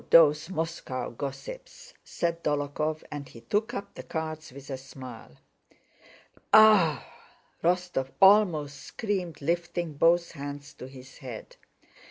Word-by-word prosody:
"Oh, - - -25
those 155 0 +6
Moscow 165 -7 -3
gossips!" 150 - -8
said 170 0 -2
Dólokhov, 150 +1 -1
and 145 -2 -6
he 115 - -13
took 210 - -1
up 200 - -6
the - - -8
cards 155 -2 -5
with 140 +1 -10
a 135 - -3
smile. 130 - -11 1.1
"Aah!" 190 - +7 0.6
Rostóv 175 -6 +1
almost 180 -8 +5
screamed 185 - -4
lifting 170 +1 -1
both 170 +3 +3
hands 145 0 -7
to 130 - -9
his 130 0 -13
head. 125 -6 -8
155 Hz, 125 wpm, -28 LUFS, 140-175 Hz, 1.1 s, Aah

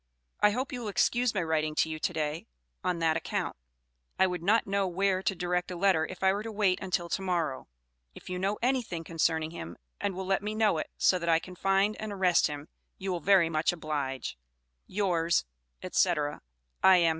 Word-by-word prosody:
I 210 - +6
hope 255 +7 -2
you 250 - -4
will 225 - -4
excuse 240 +3 +1
my 190 - +1
writing 155 -1 0
to 160 - +2
you 155 0 -5
to - - 0
day, 155 -1 -3 0.4
on 180 -1 0
that 165 -1 +2
account. - - -3 0.6
I 190 - +5
would 180 -2 -2
not 210 +6 +3
know 195 0 0
where 190 +1 +1
to 195 - 0
direct 180 0 -1
a 180 - -4
letter 175 -3 +3
if 185 0 -8
I 190 0 +5
were 200 - -2
to 225 +1 -6
wait 200 -3 +2
until 180 -2 -1
to 195 - -1
morrow. 170 -8 -1 0.5
If - - -13
you 180 0 -3
know 195 +3 0
anything 245 -10 0
concerning 160 -1 0
him 85 - -7 0.2
and 200 -2 -2
will 190 +1 -4
let 195 +1 +1
me 210 +1 -3
know 215 -7 +3
it, - - -4
so 185 - +3
that 170 0 -2
I 165 - +6
can 180 +3 -8
find 195 +3 +2
and 215 -1 -4
arrest 185 -3 +3
him, 145 0 -7 0.3
you 190 0 -3
will 175 - -1
very 185 0 +5
much 160 0 +1
oblige 145 - -4 0.5
Yours, 175 - +1 0.4
&c., 180 - +3 0.7
I.M. 180 -3 +6
180 Hz, 205 wpm, -29 LUFS, 165-195 Hz, 0.7 s, I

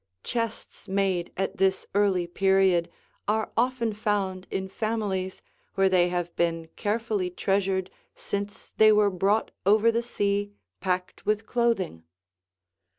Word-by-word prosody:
Chests 230 -2 -4
made 190 -3 0
at 195 - -2
this 190 0 +2
early 195 -3 +2
period 190 -1 +3 0.4
are 215 +1 0
often 235 -2 +1
found 200 -3 -1
in 190 0 -2
families 195 -3 -2 0.3
where 195 0 +4
they 180 -1 +4
have 175 -1 -3
been 165 -1 0
carefully 210 -3 -1
treasured 190 0 0 0.2
since 200 0 -5
they 215 0 +7
were 210 -1 +4
brought 195 +4 +1
over 215 +4 +5
the 230 +1 0
sea 205 -3 -1 0.3
packed 180 -1 -3
with 215 +1 +1
clothing. 230 - 0
195 Hz, 125 wpm, -27 LUFS, 185-215 Hz, 0.4 s, they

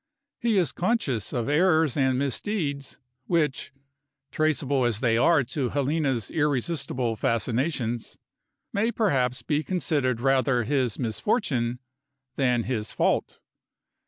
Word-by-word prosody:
He 230 -4 +1
is 170 -8 +2
conscious 175 - -1
of 120 -3 -2
errors 160 -2 +3
and 130 -2 +2
misdeeds, 140 - -2 0.3
which 150 -6 0 0.6
traceable 145 -4 +1
as 120 -3 +1
they 120 -2 +2
are 145 +5 +4
to 130 +1 -2
Helena's 140 -4 -1
irresistible 140 -5 -1
fascinations 120 +2 -1 0.6
may 220 +4 +1
perhaps 130 - 0
be 150 -1 0
considered 145 -10 0
rather 130 -1 +2
his 130 -3 0
misfortune 120 - 0 0.6
than 125 -3 +1
his 110 -3 -3
fault. - - 0
135 Hz, 110 wpm, -26 LUFS, 120-155 Hz, 0.6 s, are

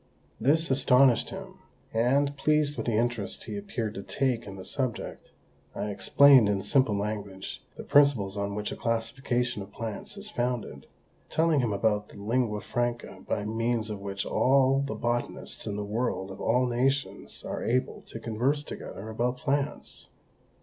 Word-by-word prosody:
This 160 +3 +2
astonished 130 -2 +4
him; - - -9 0.3
and, 135 +5 +2
pleased 150 0 +2
with - - -4
the 115 -2 +2
interest 115 -4 -1
he - - -6
appeared 195 - -3
to 100 - -5
take 125 +2 -1
in 100 - -7
the 95 - -9
subject, 130 -5 -4 0.4
I 105 - -2
explained, 130 +2 +6
in 100 -2 0
simple 110 -1 +3
language, 100 -2 -5
the - - -6
principles 135 -9 +4
on 100 0 -2
which 105 0 -3
a - - -4
classification 120 0 -1
of 95 +1 -9
plants 115 - -6
is 205 +1 -7
founded, 120 -1 -3 0.4
telling 160 -1 +3
him 120 -4 +1
about 105 0 +1
that - - -13
lingua 110 0 0
franca 120 -5 -3
by 105 - -1
means 115 0 -1
of 105 - -5
which 100 0 -3
all 135 +1 +3
the 140 - -3
botanists 120 0 -3
in 100 - -2
the 105 - -3
world 105 -3 -2
of 95 - -9
all 125 +2 +3
nations 130 +3 -1
are - - -4
able 130 +3 0
to 115 - -7
converse 125 +7 0
together 105 -7 -8
about 120 +3 -1
plants. 140 +3 -2
120 Hz, 165 wpm, -28 LUFS, 105-135 Hz, 0.4 s, explained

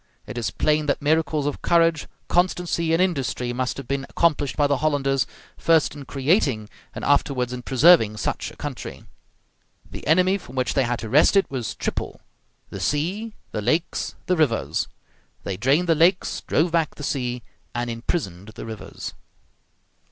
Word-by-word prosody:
It - - -8
is 120 -3 -1
plain 150 0 +1
that 140 - +1
miracles 155 0 +1
of 145 - -2
courage, 165 -3 +3 0.2
constancy, 175 -2 +1
and 165 - +3
industry 135 -8 0
must 130 +1 -2
have 140 -3 -7
been 135 +1 -2
accomplished 150 -4 +1
by 145 - +4
the 140 -1 +2
Hollanders, 135 -3 +1 0.3
first 165 -2 +3
in 145 -2 -9
creating 135 - +1 0.3
and - - -4
afterwards 130 -3 +1
in 125 - -5
preserving 130 -4 +5
such 105 - -2
a - - -14
country. 135 -5 -6 0.8
The - - -9
enemy 185 +5 +4
from 130 -7 -13
which 130 -1 0
they 135 - +2
had 120 0 -1
to 110 - -5
wrest 150 - +5
it 195 - +3
was 125 -4 -3
triple: - - -3 0.5
the - - -6
sea, 195 +10 -1 0.2
the 105 - -3
lakes, 155 +10 -1
the 180 - +2
rivers. 150 -9 +1 0.6
They 100 - -3
drained 135 - +2
the 165 - +5
lakes, 170 +4 +2
drove 165 +3 +2
back 165 -2 +1
the 145 - -9
sea, 125 -4 -2 0.3
and 120 0 -1
imprisoned 115 - -3
the - - -7
rivers. 110 -2 -7
145 Hz, 165 wpm, -23 LUFS, 125-165 Hz, 0.8 s, preserving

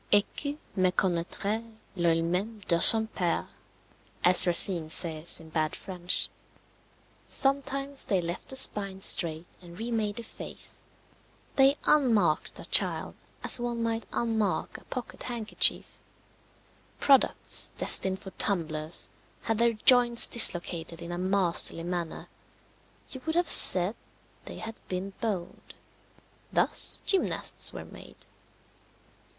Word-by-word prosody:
Et 205 0 +3
que 290 0 -6 0.2
méconnaîtrait 185 +3 -3 0.3
l'oeil 165 -2 -1
même 195 +6 -5
de 170 -1 0
son 220 +5 +5
père, 180 -6 -4 0.8
as 180 +1 +9
Racine 170 -2 +3
says 160 -1 -1
in 160 -1 -16
bad 155 0 -3
French. 180 -2 -1 1.0
Sometimes 275 0 -2
they 195 - -1
left 170 0 -7
the 265 - -1
spine 200 -7 +3
straight 165 -3 +2 0.2
and 175 -1 -15
remade 220 -2 -4
the 235 - -9
face. - - -10 0.7
They 275 +1 +2
unmarked 225 - 0
a - - -8
child - - 0 0.3
as - - +2
one 240 -1 -5
might 230 0 -5
unmark 220 -5 -4
a - - -25
pocket 250 -3 -10
handkerchief. 235 -3 -3 1.0
Products, 275 -2 +1
destined 190 0 +2
for 190 - -13
tumblers, 160 -4 -1 0.3
had 225 -1 -4
their 235 0 +1
joints 240 +1 +6
dislocated 170 -6 +2
in 170 - -9
a 175 - -7
masterly 185 -3 0
manner 175 -2 -7 0.8
you 260 - -9
would 320 - -3
have 350 -1 -1
said 185 +4 +8 0.5
they - - -10
had 225 0 -9
been 190 +2 -7
boned. 200 -7 -7 0.8
Thus - - +1
gymnasts 385 -2 -1
were - - -11
made. - - -16
195 Hz, 120 wpm, -25 LUFS, 175-235 Hz, 1.0 s, as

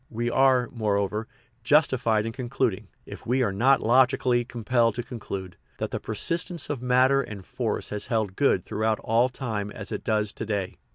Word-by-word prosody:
We 120 +1 -2
are, 130 -2 +4
moreover, 105 -1 -1 0.4
justified 120 -6 +3
in 115 - -3
concluding, 120 -3 -2 0.2
if - - -10
we 130 +2 +2
are 110 - 0
not 130 +7 +3
logically 125 0 +3
compelled 120 -1 0
to 120 - -3
conclude, 95 -7 -7 0.2
that - - -3
the - - -2
persistence 170 -1 -1
of 135 -5 -4
matter 130 +2 +4
and 100 -7 -8
force - - -3
has 105 -1 -4
held 110 -5 -1
good 120 -9 +2
throughout 110 0 0
all 115 +3 +2
time 110 -6 -4
as 105 -1 -8
it - - -4
does 105 -2 0
to 115 - -5
day. 100 -4 -3
115 Hz, 175 wpm, -26 LUFS, 105-130 Hz, 0.4 s, are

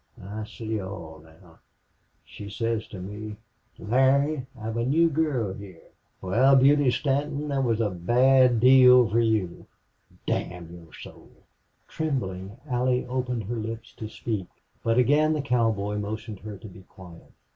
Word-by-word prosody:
I 105 +3 -7
see 110 -1 -5
all 85 -5 -8
now.... 80 +1 -20 0.7
She 100 - -10
says 115 +1 -2
to 95 - -9
me, 105 +3 -7 0.4
'Larry, 135 +4 +1
I've 110 +1 -4
a 115 - 0
new 160 +6 +3
girl 140 -10 0
heah'.... 95 -4 -13 0.3
Wal, 125 +9 +4
Beauty 140 +1 +5
Stanton, 140 +4 -1
thet 135 -1 0
was 115 -3 0
a 110 -3 0
bad 125 +6 +3
deal 125 0 +7
for 110 +3 +1
you 110 -6 -1 0.6
damn 85 -1 -4
your 85 -2 -14
soul!" - - -13 0.6
Trembling, 100 -10 -4
Allie 125 -1 0
opened 125 -2 -3
her 120 +4 -4
lips 115 +1 -6
to 110 - -6
speak, 110 -4 -4 0.4
but 115 +1 +1
again 150 +5 +3
the 150 - -1
cowboy 110 -6 0
motioned 110 0 -6
her 105 -1 -8
to 110 - -11
be 95 -1 -13
quiet. 90 -3 -15
115 Hz, 145 wpm, -26 LUFS, 100-130 Hz, 0.7 s, deal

